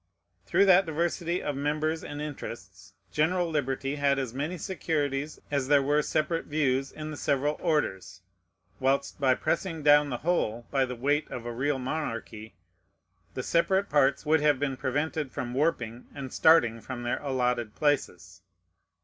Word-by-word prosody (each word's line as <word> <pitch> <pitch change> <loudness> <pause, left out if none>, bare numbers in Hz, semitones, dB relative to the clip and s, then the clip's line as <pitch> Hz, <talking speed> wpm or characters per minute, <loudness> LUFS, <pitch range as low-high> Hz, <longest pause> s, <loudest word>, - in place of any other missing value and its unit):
Through 200 - +4
that 190 -1 +6
diversity 170 +2 -1
of 145 - -2
members 155 +3 -1
and 145 - -6
interests, 105 -10 -8 0.2
general 170 +3 +1
liberty 135 -1 -1
had 140 -1 +2
as 130 -4 -3
many 150 +7 -3
securities 150 -4 -2
as 140 -2 0
there 145 -1 +4
were 145 +2 +2
separate 160 +2 -1
views 135 -3 0
in 155 0 -7
the 150 - -6
several 145 +2 0
orders; 95 - -1 0.6
whilst 135 +2 0
by 130 -2 +4
pressing 165 0 -2
down 145 0 +6
the 125 - -2
whole 120 -10 0
by 135 -2 +2
the 125 0 -6
weight 145 +5 0
of 120 - -6
a 120 - -4
real 135 +4 0
monarchy, 115 - -5 0.8
the - - -3
separate 190 +4 +2
parts 145 0 +2
would 155 0 +3
have 150 -2 +4
been 135 -1 -1
prevented 145 +2 -2
from 120 -1 -4
warping 125 -5 -1
and 135 -2 -6
starting 120 -9 +4
from 125 0 -6
their 120 - -2
allotted 125 -5 -1
places. 145 - -1
145 Hz, 160 wpm, -28 LUFS, 130-155 Hz, 0.8 s, that